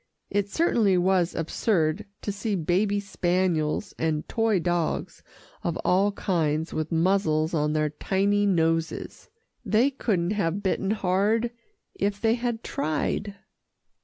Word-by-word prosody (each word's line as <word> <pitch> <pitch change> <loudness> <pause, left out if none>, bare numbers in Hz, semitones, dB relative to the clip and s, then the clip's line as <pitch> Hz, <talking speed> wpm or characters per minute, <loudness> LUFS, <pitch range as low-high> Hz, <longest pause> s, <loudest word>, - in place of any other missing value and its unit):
It 200 0 0
certainly 220 - +2
was 180 -1 +2
absurd 165 +2 0 0.2
to 205 - -1
see 205 +1 -2
baby 190 +5 +1
spaniels, 180 -3 0
and 155 -2 -1
toy 225 -3 +1
dogs 175 -1 -1 0.4
of 170 -1 -1
all 195 +3 +3
kinds 160 -5 -1
with 155 0 -3
muzzles 165 -2 +2
on 150 -1 +1
their 155 -1 +1
tiny 200 +5 +1
noses. 165 - -1 0.3
They 235 +6 +3
couldn't 195 -9 0
have 200 -1 -1
bitten 190 0 0
hard 210 +3 +1 0.4
if 200 +1 -1
they 225 +1 +3
had 235 -1 -2
tried. 155 +6 -2
190 Hz, 125 wpm, -26 LUFS, 165-205 Hz, 0.4 s, all